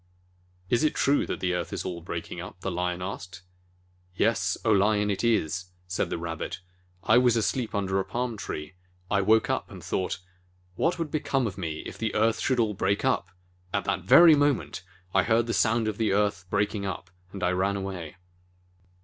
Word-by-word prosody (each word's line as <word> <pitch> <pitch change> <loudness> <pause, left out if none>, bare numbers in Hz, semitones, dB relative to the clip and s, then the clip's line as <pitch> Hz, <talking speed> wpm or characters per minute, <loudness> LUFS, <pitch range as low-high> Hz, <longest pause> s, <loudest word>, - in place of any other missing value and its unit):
"Is 120 +8 +2
it 155 - +2
true 140 +1 +2
that - - -4
the 90 -1 +1
earth 90 -1 -3
is - - -4
all 85 -2 -4
breaking 85 0 -5
up?" 90 0 -10
the 95 - -2
Lion 90 0 -2
asked. 95 -1 -7 0.7
"Yes, 95 -4 +1
O 110 - +4
Lion, 105 0 +3
it 100 - -2
is," 95 -6 +1 0.2
said 90 - -1
the - - -2
Rabbit. 85 0 -4 0.4
"I 110 +3 +5
was 120 -2 +4
asleep 115 0 -1
under 95 -1 0
a - - +1
palm 120 +1 -3
tree. 75 -5 -6 0.4
I 100 - +3
woke 110 +3 +4
up - - -1
and - - -10
thought, 95 - -1 0.6
'What 170 - +1
would 165 -3 -3
become 135 -4 0
of 100 -5 -3
me 80 -5 -4
if - - -8
the 110 -1 -2
earth 110 +1 +2
should 130 -2 +1
all 110 -2 +2
break 100 +3 0
up 130 -8 +1 0.2
?' 90 0 -34
At - - 0
that - - 0
very 170 -1 +8
moment, 145 -8 +1 0.3
I 95 - +5
heard 115 +2 +2
the 115 - -2
sound 115 0 +2
of 110 0 -3
the 110 -3 +2
earth 100 -2 +1
breaking 100 0 0
up, 90 -2 -5 0.2
and 100 -1 -6
I 90 - +3
ran 95 +2 +1
away." 95 -4 -5
100 Hz, 200 wpm, -27 LUFS, 90-115 Hz, 0.7 s, very